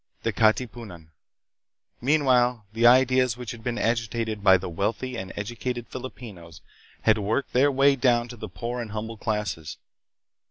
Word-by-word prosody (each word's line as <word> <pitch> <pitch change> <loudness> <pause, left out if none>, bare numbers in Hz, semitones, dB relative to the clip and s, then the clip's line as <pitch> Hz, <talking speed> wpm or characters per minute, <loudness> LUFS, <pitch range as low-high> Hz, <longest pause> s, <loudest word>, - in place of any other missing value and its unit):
The - - -1
Katipunan. 110 -7 -1 0.9
Meanwhile 125 -5 +2
the 115 +1 +4
ideas 130 -1 +4
which 125 -3 -6
had 115 -2 -10
been 120 0 -2
agitated 115 -2 -1
by 95 -2 +7
the 95 - -6
wealthy 105 +9 -2
and 95 -4 -6
educated 120 +3 -4
Filipinos 105 -10 -9 0.4
had 110 -1 +4
worked 110 +7 -2
their 140 +3 +4
way 140 +1 +4
down 120 -2 +2
to 120 - -8
the 110 -2 -8
poor 120 +6 -4
and 110 -3 -7
humble 110 +1 -5
classes. 105 -8 -3
115 Hz, 150 wpm, -25 LUFS, 105-125 Hz, 0.9 s, by